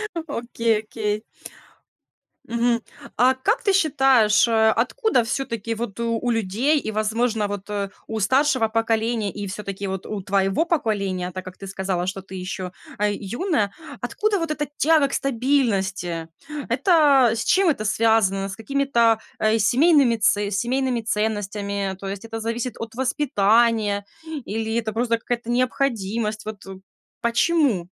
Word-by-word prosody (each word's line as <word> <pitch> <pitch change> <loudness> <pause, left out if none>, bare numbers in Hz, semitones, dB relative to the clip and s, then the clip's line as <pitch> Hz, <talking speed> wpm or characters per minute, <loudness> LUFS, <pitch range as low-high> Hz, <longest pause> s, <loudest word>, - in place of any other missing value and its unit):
Окей 235 -8 -1
окей. 215 0 -3 1.2
Мгм. 235 0 +1 0.3
А 255 +3 +4
как 390 - 0
ты 400 - +2
считаешь 270 - +4
э, 220 -1 +4
откуда 340 - +1
всё-таки 230 -2 -3
вот, 235 -1 -5
э, - - -1
у 230 +1 -1
людей 230 +7 +1
и, 220 - -4
возможно, 215 0 0
вот, 205 0 -6
э, 200 -1 -2 0.2
у 220 0 -3
старшего 260 +3 +3
поколения 225 -1 0
и 205 -1 -5
всё-таки 195 0 -5
вот 190 -1 -4
у 210 -2 -4
твоего 195 - +1
поколения, 200 - -1
так 185 0 -7
как 185 0 -10
ты 195 - -9
сказала, 190 -2 -2
что 190 +1 -3
ты 190 0 -12
ещё, 185 0 -5 0.3
а, 210 - +2
юная, 205 - -1 0.3
откуда 425 -1 0
вот 330 -2 -3
эта 295 -1 -1
тяга 310 -1 +4
к 275 - -5
стабильности? 205 - 0 0.4
Это, 275 - +4
с 225 - -2
чем 380 -1 +3
это 215 -9 0
связано? 210 -3 +2
С 200 - -7
какими-то, 235 -2 +2 0.2
э, 215 +1 +2
семейными 265 - +4
це 210 -2 +2
семейными 245 +4 0
ценностями? 205 -3 -2
То 195 - -5
есть 200 +2 -6
это 225 0 -6
зависит 230 +2 -3
от 230 0 -7
воспитания 230 -6 +2 0.4
или 220 +2 -2
это 225 -2 -1
просто 230 +1 0
какая-то 235 0 -4
необходимость? 230 -4 -1
Вот, 215 -3 -7
э, 195 - -7 0.5
почему. 255 - +2
225 Hz, 145 wpm, -23 LUFS, 200-255 Hz, 1.2 s, А